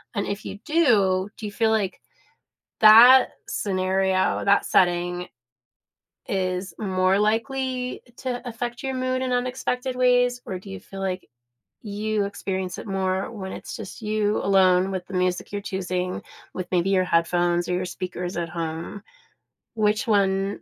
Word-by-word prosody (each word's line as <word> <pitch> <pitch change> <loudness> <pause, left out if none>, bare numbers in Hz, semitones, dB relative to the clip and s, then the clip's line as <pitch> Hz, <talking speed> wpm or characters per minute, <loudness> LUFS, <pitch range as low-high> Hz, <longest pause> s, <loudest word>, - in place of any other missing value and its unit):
And 200 - -1
if 200 +1 -4
you - - -6
do, 210 - +3
do 215 - -7
you - - -6
feel 225 +1 +1
like 205 -4 0 0.8
that 235 +4 +9 0.2
scenario, 190 -1 0
that 200 0 +3
setting 175 0 +1 1.0
is 185 -1 -2
more 185 -1 +1
likely 250 +4 -1 0.2
to 250 -1 -4
affect 240 +2 -5
your 265 -1 -3
mood 255 0 -1
in 255 -1 -1
unexpected 250 +1 -2
ways? 245 -1 +3
Or 185 - -4
do 195 +1 -12
you 195 0 -7
feel 195 0 -10
like 185 -1 -3 0.5
you 210 0 -2
experience 190 -2 -4
it - - -8
more 190 0 -1
when 190 -4 -7
it's - - -7
just 220 0 -9
you 210 0 0
alone 190 -1 +4
with 185 -2 -4
the 190 - -9
music 180 +1 -1
you're 205 - -2
choosing 185 -2 -3 0.3
with 185 -1 -4
maybe 180 +2 +2
your 185 -1 +3
headphones 175 +1 +1
or 180 - 0
your 185 +1 -1
speakers 180 0 -5
at 170 -1 -2
home? 165 +4 -5 0.7
Which 215 +1 +1
one 195 -1 +1
195 Hz, 150 wpm, -24 LUFS, 185-225 Hz, 1.0 s, that